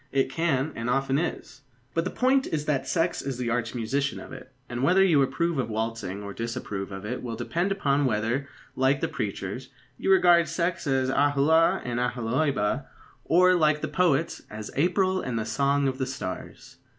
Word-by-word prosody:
It 135 -1 +1
can, 155 -2 0
and 115 +1 -3
often 135 +2 +1
is. 160 -4 -4 0.3
But 165 +1 0
the - - -1
point 265 +1 +2
is 150 -2 -2
that 140 -3 -1
sex 170 0 0
is 135 -2 -4
the 120 -2 -2
arch 115 0 -2
musician 135 +5 -1
of - - -10
it, 130 -1 -11 0.2
and 120 0 -4
whether 185 +8 +5
you 160 -7 +4
approve 140 +4 0
of 125 - -1
waltzing 110 -3 -3
or 100 0 -6
disapprove 115 -4 -4
of 95 +1 -7
it 125 +4 -4
will 120 -2 -4
depend 170 - -1
upon 145 -7 +1
whether, 120 +4 -1 0.3
like 135 +1 +2
the - - +1
preachers, 105 +4 -4 0.3
you - - -1
regard 175 -3 +5
sex 170 0 -2
as 130 -1 +1
Aholah 145 +4 +3
and 120 -1 -2
Aholibah, 125 0 0 0.4
or, 180 +2 +5
like 155 -3 +3
the 155 - -2
poets, 155 0 +1
as 105 0 -7
April 185 +4 +2
and 125 -2 -3
the 110 - -2
song 140 +4 +1
of 130 0 -2
the 130 - -1
stars. 110 -8 -7
135 Hz, 185 wpm, -26 LUFS, 120-160 Hz, 0.4 s, whether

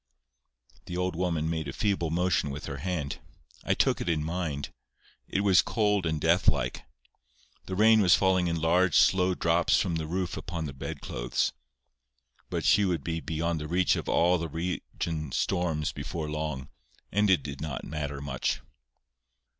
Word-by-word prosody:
The 90 - -4
old 90 -1 -1
woman 85 -3 0
made 80 -2 -2
a 70 - -5
feeble 95 -6 0
motion 85 -2 +1
with 70 +2 -6
her 70 -2 -5
hand. 75 -2 -3 0.4
I - - +1
took - - +2
it - - -2
in 80 -2 +1
mine. 80 -3 -3 0.6
It 100 - 0
was 100 -3 +5
cold 105 -5 +1
and 80 -1 -1
deathlike. - - +2 0.9
The 95 - -3
rain 110 +2 +6
was 90 -2 +6
falling 95 -2 +2
in 85 -1 -1
large 85 +2 +3
slow 90 -1 +4
drops 85 0 +3
from 85 -4 0
the 80 -1 -3
roof 90 +2 -2
upon 85 -2 -4
the 70 - -5
bedclothes. - - -2 1.0
But - - -2
she 105 - +5
would 90 -7 0
be 80 -1 -2
beyond 80 0 -2
the 75 - -5
reach 90 +3 +2
of - - -4
all 90 +1 +3
the 80 0 -3
region 80 -2 -4
storms 80 -3 0
before 75 +3 -5
long, 75 -3 -4 0.4
and 105 +1 +2
it 95 - +4
did 70 -1 -6
not 75 -5 -4
matter 75 -3 -4
much. 70 -3 -2
85 Hz, 165 wpm, -28 LUFS, 75-90 Hz, 1.0 s, rain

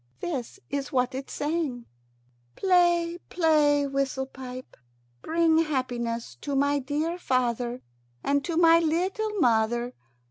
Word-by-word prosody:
This 305 +1 -4
is 280 0 -3
what 255 -1 +1
it 265 +1 -6
sang: 295 -6 -2 0.7
"Play, 345 -2 +3
play, 300 -4 +3
whistle 275 -1 -1
pipe. 255 -1 -9 0.5
Bring 325 0 +3
happiness 245 -6 -2
to 285 -1 -3
my 285 +1 +2
dear 305 +6 -2
father 245 -3 -1 0.4
and 280 0 +1
to 335 -2 -2
my 335 -1 +6
little 365 +7 0
mother. 240 -1 +2
285 Hz, 115 wpm, -27 LUFS, 255-330 Hz, 0.7 s, my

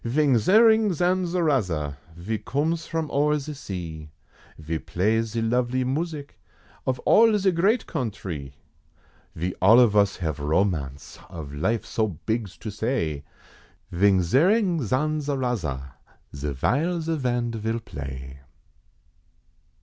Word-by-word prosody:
Vings 125 -2 +2
zerring 220 +1 +6
zanzaraza, 165 - 0 0.2
ve 105 +6 -4
cooms 160 +4 -1
from 160 -2 -3
o'er 150 +1 +2
ze 150 +1 -6
sea, 85 - -7 0.5
Ve 80 +1 -4
plays 110 +8 0
ze 115 -1 -1
lovely 125 +2 +1
music, 145 +2 -4 0.5
of 130 -1 +1
all 225 -1 +6
ze 190 -1 +2
great 195 +8 +2
countree. 95 - -5 0.8
Ve 90 +3 -2
all 110 +6 +7
of 115 -4 +4
us 100 -1 +3
have 80 -5 -3
romance 75 -3 -1
of 80 -6 -8
life 95 +10 -1
so 110 -1 0 0.2
bigs 110 -4 -2
to 110 - -6
say, 105 - -2 0.7
Vings 95 -1 +2
zerring 180 - +3
zanzaraza, 125 - -1 0.4
ze 70 +1 -3
vile 155 - 0
ze 165 0 -1
band 120 -3 -1
vill 115 +1 -2
play. 70 - -8
115 Hz, 120 wpm, -25 LUFS, -, 0.8 s, all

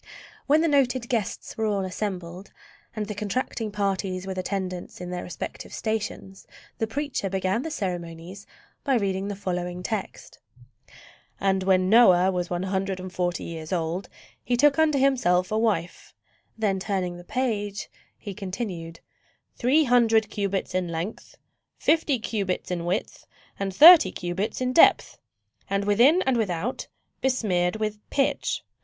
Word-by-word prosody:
When 300 +2 +4
the 330 - +2
noted 260 -4 +2
guests 225 -6 -2
were 220 - +1
all 200 -2 0
assembled 185 -1 -5 0.4
and 215 -1 -2
the 210 - -5
contracting 215 +1 -3
parties 195 -2 -2
with 190 -1 -4
attendants 185 -2 -4
in 180 0 -6
their 180 0 -3
respective 175 - -7
stations, 210 -3 -4 0.3
the 225 - 0
preacher 275 -4 -3
began 190 +3 0
the 320 - -4
ceremonies 180 - -5 0.4
by 275 -3 +2
reading 195 -3 -1
the 205 - -4
following 180 -2 -4
text: 210 -1 -5 1.0
"And 195 -1 +1
when 185 -1 +3
Noah 190 -4 +6
was 180 -1 -2
one 175 0 -2
hundred 190 0 -2
and 185 0 -8
forty 175 -1 -1
years 160 -2 -7
old, 175 +1 -2 0.3
he 245 - 0
took 290 +3 +4
unto 310 -2 +3
himself 220 -9 +2
a 215 - +1
wife" 200 -7 -2 0.4
(then 205 -3 0
turning 185 -3 -2
the 175 - -11
page 205 -3 -2 0.3
he 205 - -7
continued) 185 -4 -6 0.5
"three 270 +6 +3
hundred 225 -4 +3
cubits 200 -2 -2
in 185 -1 0
length, 170 +6 -6 0.4
fifty 310 -4 +2
cubits 200 -5 -3
in 170 -1 -2
width, 180 +3 -3 0.3
and 195 -1 -2
thirty 310 - +9
cubits 190 +7 -3
in 255 0 0
depth, 330 - +5 0.5
and 195 0 0
within 245 - +5
and 265 -2 +1
without 205 +2 -2 0.3
besmeared 195 -9 +1
with 215 -1 -3
pitch." 275 -1 0
200 Hz, 145 wpm, -25 LUFS, 185-230 Hz, 1.0 s, thirty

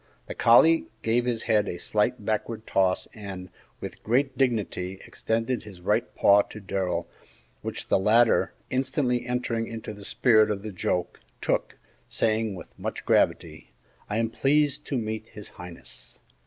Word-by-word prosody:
The - - -6
collie 160 +8 +5 0.2
gave 120 +2 +2
his 120 -2 -1
head 105 -3 +2
a 85 - -3
slight 105 +4 0
backward 110 +1 -2
toss, 95 -1 +1
and, 95 -4 -8 0.3
with - - -8
great 135 +5 +1
dignity, 105 -7 -1
extended 115 +2 -1
his 100 -4 -12
right 90 - 0
paw 100 +1 +6
to 110 - -9
Darrell, 95 -2 -2 0.5
which - - -5
the - - +3
latter, 110 +4 +4 0.2
instantly 130 -2 0
entering 120 -2 -1
into 110 -1 -6
the 105 -1 -11
spirit 110 0 +4
of 100 -1 -2
the 110 - -5
joke, 90 -1 -2 0.2
took, - - -1 0.3
saying, 110 -2 0
with 90 - -10
much - - -5
gravity, - - +1 0.4
"I 105 - -1
am 115 0 0
pleased 145 +2 +2
to 140 - -1
meet 110 -1 -3
His 105 -3 -10
Highness!" 90 -1 -10
110 Hz, 155 wpm, -26 LUFS, 100-120 Hz, 0.5 s, paw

